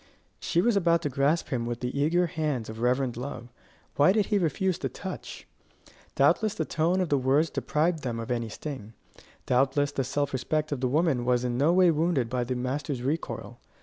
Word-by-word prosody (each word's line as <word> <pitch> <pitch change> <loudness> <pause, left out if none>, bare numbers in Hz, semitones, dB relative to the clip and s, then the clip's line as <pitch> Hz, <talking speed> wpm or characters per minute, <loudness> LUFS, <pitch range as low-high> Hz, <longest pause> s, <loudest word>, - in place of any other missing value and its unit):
She 170 - +1
was 235 +3 +2
about 170 -3 +2
to 145 - 0
grasp 140 +5 +1
him 120 -3 -2
with 120 0 -4
the 125 +1 -3
eager 160 +5 +2
hands 150 -8 -2
of 110 +1 -8
reverent 125 0 +1
love: 125 -2 -6 0.5
why 145 +5 +6
did 210 -1 +2
he 205 0 +1
refuse 185 +2 0
the - - -2
touch? 190 -1 -8 0.7
Doubtless 215 -1 +3
the 160 - -1
tone 170 +6 +1
of 180 - -1
the 145 - +2
words 140 +5 +2
deprived 160 +2 0
them 120 -4 -3
of 115 +1 -5
any 120 -2 -1
sting. 125 -4 -7 0.5
Doubtless 135 +3 +2
the 135 - -1
self 140 +2 -2
respect 150 +4 -1
of 140 -3 -2
the 130 - +2
woman 145 -2 +1
was 125 0 +1
in 125 -1 -1
no 145 +6 +3
way 180 -1 +5
wounded 155 -7 0
by 125 -1 0
the 125 +1 -3
master's 130 +1 -3
recoil. 150 +5 -4
145 Hz, 200 wpm, -27 LUFS, 125-165 Hz, 0.7 s, why